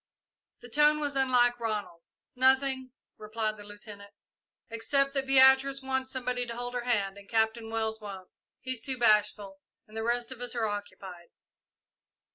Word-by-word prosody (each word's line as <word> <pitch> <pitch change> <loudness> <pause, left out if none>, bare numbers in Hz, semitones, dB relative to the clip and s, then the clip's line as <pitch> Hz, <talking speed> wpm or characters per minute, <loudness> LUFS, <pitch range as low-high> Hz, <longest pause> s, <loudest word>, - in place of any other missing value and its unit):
The 245 - -12
tone 300 +4 +3
was 290 -2 -3
unlike 245 -2 +2
Ronald. 210 -7 -4 0.3
"Nothing," 260 0 +2 0.3
replied 215 0 -3
the 205 - -11
Lieutenant, 205 0 -12 0.6
"except 275 +5 +1
that 270 -1 -2
Beatrice 265 +1 +5
wants 265 0 -2
somebody 250 -1 -2
to 235 - -6
hold 245 0 -4
her 245 -1 -4
hand 200 -5 -1
and 200 - -17
Captain 225 0 0
Wells 220 -1 -2
won't. 195 -3 -9 0.3
He's 255 -3 -3
too 260 +1 -2
bashful, 210 -3 +1 0.3
and 215 - -17
the 225 - -3
rest 240 +1 -1
of 250 -2 -9
us 245 0 -2
are 230 -2 0
occupied." 195 -4 -8
235 Hz, 155 wpm, -29 LUFS, 215-260 Hz, 0.6 s, Beatrice